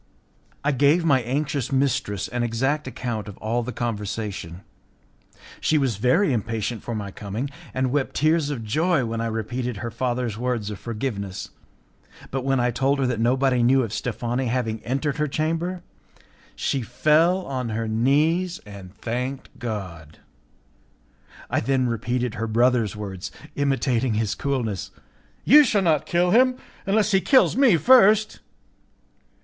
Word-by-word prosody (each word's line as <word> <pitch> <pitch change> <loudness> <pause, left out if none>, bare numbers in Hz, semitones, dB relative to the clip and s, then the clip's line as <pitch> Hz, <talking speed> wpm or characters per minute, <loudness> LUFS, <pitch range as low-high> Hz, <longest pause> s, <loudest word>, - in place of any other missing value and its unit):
I 150 - +2
gave 145 +5 +3
my 135 -5 +4
anxious 135 +2 -2
mistress 130 -7 0
an 120 - -3
exact 135 +6 0
account 120 -4 -4
of 100 - -9
all 115 +3 -1
the 125 +2 -5
conversation. 105 -6 -4 1.0
She 155 - +2
was 130 -8 0
very 130 - +3
impatient 115 0 -2
for 120 - -5
my 100 -2 -5
coming, 110 +8 -5 0.2
and 130 -1 -1
wept 140 -1 -1
tears 155 0 +2
of 130 -6 -4
joy 155 +5 +1
when 115 0 -3
I 115 - -1
repeated 115 +2 -3
her 115 +3 -5
father's 120 -2 -2
words 120 -4 -2
of 105 - -7
forgiveness; 105 -5 -4 0.8
but 135 -1 -2
when 135 -1 +1
I 120 0 +2
told 135 +4 +1
her 135 - 0
that 125 -3 -1
nobody 125 +2 +2
knew 130 +2 +4
of 110 -3 -5
Steffani 120 +2 -2
having 115 -3 -2
entered 140 +4 -1
her 150 0 0
chamber, 165 +5 -2 0.7
she 135 - -1
fell 155 - +2
on 130 -3 -3
her 110 +1 -2
knees 155 +10 +1
and 100 -2 -11
thanked 125 +3 -4
God. 90 -10 -6 1.3
I - - 0
then 130 -1 +1
repeated 120 +1 -1
her 115 +1 -3
brother's 115 -1 +2
words, 100 -2 -6 0.2
imitating 130 -4 +1
his 110 -1 0
coolness: 120 -9 -2 0.6
"You 300 +3 +8
shall 210 -7 +1
not 155 -5 +2
kill 175 +1 +2
him, 255 +4 +5 0.3
unless 210 +1 +2
he 195 -1 +4
kills 260 +5 +4
me 255 -10 +5
first." 215 0 +5
125 Hz, 150 wpm, -24 LUFS, 110-145 Hz, 1.3 s, You